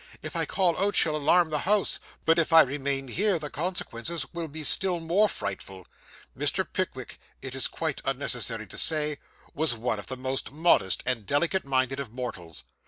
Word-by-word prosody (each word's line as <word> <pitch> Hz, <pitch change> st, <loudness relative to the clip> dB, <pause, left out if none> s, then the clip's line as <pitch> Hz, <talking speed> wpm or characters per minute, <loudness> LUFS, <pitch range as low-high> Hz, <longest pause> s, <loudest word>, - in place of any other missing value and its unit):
If -, -, -6 dB
I -, -, +2 dB
call 180 Hz, -4 st, +1 dB
out 205 Hz, +1 st, +1 dB
she'll 155 Hz, -1 st, +4 dB
alarm 160 Hz, +3 st, +3 dB
the 150 Hz, -, +3 dB
house; 205 Hz, +4 st, +2 dB, 0.3 s
but 165 Hz, +1 st, +4 dB
if 165 Hz, -, 0 dB
I 165 Hz, 0 st, +9 dB
remain 135 Hz, 0 st, -1 dB
here 190 Hz, -, +2 dB
the 150 Hz, -2 st, -6 dB
consequences 165 Hz, -3 st, -3 dB
will 170 Hz, -1 st, -4 dB
be 155 Hz, +1 st, -6 dB
still 180 Hz, +4 st, +3 dB
more 180 Hz, +6 st, +2 dB
frightful.' 95 Hz, -, -6 dB, 0.5 s
Mr. -, -, +1 dB
Pickwick, -, -, -4 dB, 0.2 s
it 130 Hz, -, -5 dB
is 135 Hz, -2 st, -1 dB
quite 160 Hz, -4 st, -3 dB
unnecessary 125 Hz, -4 st, -2 dB
to 95 Hz, -, -7 dB
say, 150 Hz, -2 st, +3 dB, 0.3 s
was 155 Hz, -4 st, 0 dB
one 115 Hz, -1 st, -2 dB
of -, -, -7 dB
the 130 Hz, -, -5 dB
most 130 Hz, +1 st, -3 dB
modest 145 Hz, -, +2 dB
and 120 Hz, -5 st, -1 dB
delicate 170 Hz, +6 st, +1 dB
minded 135 Hz, 0 st, 0 dB
of 135 Hz, -6 st, -6 dB
mortals. 90 Hz, -, -6 dB
145 Hz, 180 wpm, -27 LUFS, 125-165 Hz, 0.5 s, I